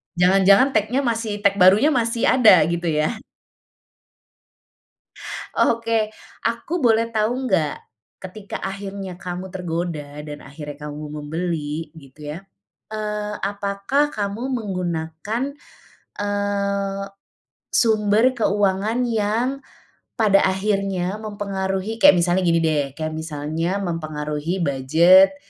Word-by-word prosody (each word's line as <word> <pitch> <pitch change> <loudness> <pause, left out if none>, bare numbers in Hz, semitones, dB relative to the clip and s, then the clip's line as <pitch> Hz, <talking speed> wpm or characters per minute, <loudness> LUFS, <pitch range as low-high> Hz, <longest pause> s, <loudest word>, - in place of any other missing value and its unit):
Jangan-jangan 195 +8 +5
tag-nya 225 +5 +1
masih 225 -3 -2
tag 200 0 +3
barunya 200 +12 +6
masih 230 -2 0
ada 215 -11 +6
gitu 170 0 -2
ya? 155 +8 0 2.5
Oke, 225 -2 0 0.3
aku 235 +8 -2
boleh 225 0 +4
tahu 215 +1 +1 0.2
enggak? 165 -8 0 0.4
Ketika 195 +2 -7
akhirnya 195 -1 -6
kamu 180 +1 -5
tergoda 165 -5 -4
dan 150 0 -7
akhirnya 145 +1 -8
kamu 150 +1 -7 0.2
membeli 160 -1 -3
gitu 140 -1 -16
ya. 155 - -5 0.5
Eee, 210 -1 -3
apakah 200 +8 0
kamu 205 +3 -3
menggunakan, 185 0 -3 0.8
eee, 200 -1 -1 0.7
sumber 215 -1 +3
keuangan 205 +3 +1
yang, 225 +2 0 0.7
pada 210 -4 +4
akhirnya 195 0 -1
mempengaruhi, 200 0 -3
kayak 290 -9 +8
misalnya 175 +1 +2
gini 165 0 +3
deh, 145 -3 0
kayak 155 -1 -3
misalnya 160 +3 -3
mempengaruhi 155 +1 -3
budget, 165 - +5
195 Hz, 100 wpm, -22 LUFS, 165-215 Hz, 2.5 s, kayak